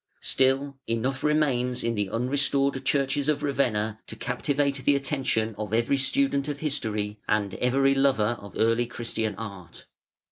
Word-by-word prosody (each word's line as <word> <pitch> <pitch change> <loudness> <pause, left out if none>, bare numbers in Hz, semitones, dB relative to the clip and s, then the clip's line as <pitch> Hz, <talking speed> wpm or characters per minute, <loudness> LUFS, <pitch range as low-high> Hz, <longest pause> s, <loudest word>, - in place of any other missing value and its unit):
Still, 135 +1 +2
enough 120 +4 -1
remains 130 -5 +1
in 115 - 0
the 105 -3 -1
un 120 +5 -1
restored 140 0 +1
churches 140 +1 +1
of 150 -1 0
Ravenna 110 -6 0
to - - -6
captivate 140 -1 0
the 145 +2 +4
attention 135 -6 -1
of 105 0 -2
every 120 +4 +2
student 140 - +1
of 145 -1 -3
history 110 -9 -2
and 105 -2 0
every 135 +2 +2
lover 130 -5 +2
of 100 - -11
early 115 +2 +2
Christian 115 -2 -3
art. 100 -6 -9
130 Hz, 150 wpm, -26 LUFS, 110-140 Hz, -, the